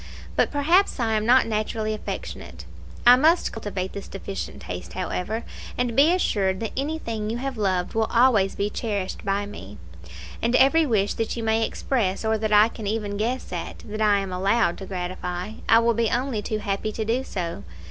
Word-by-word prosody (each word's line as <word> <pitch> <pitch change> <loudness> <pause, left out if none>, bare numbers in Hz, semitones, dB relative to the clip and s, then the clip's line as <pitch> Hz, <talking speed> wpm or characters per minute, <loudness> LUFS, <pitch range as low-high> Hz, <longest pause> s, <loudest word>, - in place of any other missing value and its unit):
But - - +3
perhaps 325 +7 +2
I 225 -2 +1
am 215 0 0
not 255 +2 +6
naturally 215 0 -1
affectionate. 215 - -6 0.4
I 245 +1 +10
must 320 +7 +3
cultivate 195 -4 -4
this 200 - -7
deficient 195 0 -6
taste, 90 -1 -6
however; 215 +6 -3 0.3
and 245 -2 0
be 290 +5 +6
assured 195 - +1
that 225 - -3
anything 260 -7 -3
you 230 - -2
have 270 +1 -3
loved 185 -4 0
will 220 0 +1
always 230 -5 +4
be 205 +1 -1
cherished 205 -5 -3
by 200 0 0
me; 105 - -10 0.6
and 235 +2 +1
every 305 +5 +5
wish 205 -5 +1
that 225 +1 -3
you 230 - -3
may 220 0 +2
express, 220 -4 -1
or 220 0 +2
that 215 0 -1
I 210 +1 +7
can 220 -2 -7
even 210 -1 -2
guess 235 +5 -2
at, - - -6
that 215 +1 -5
I 210 -1 +4
am 190 -2 -5
allowed 195 0 +1
to 195 - -7
gratify, 180 +1 -4 0.2
I 225 - +8
will 235 0 +3
be 230 0 +1
only 245 -3 -1
too 215 +1 -2
happy 210 0 -2
to 220 - -3
do 240 +4 0
so. 170 - -4
215 Hz, 190 wpm, -24 LUFS, 195-235 Hz, 0.6 s, I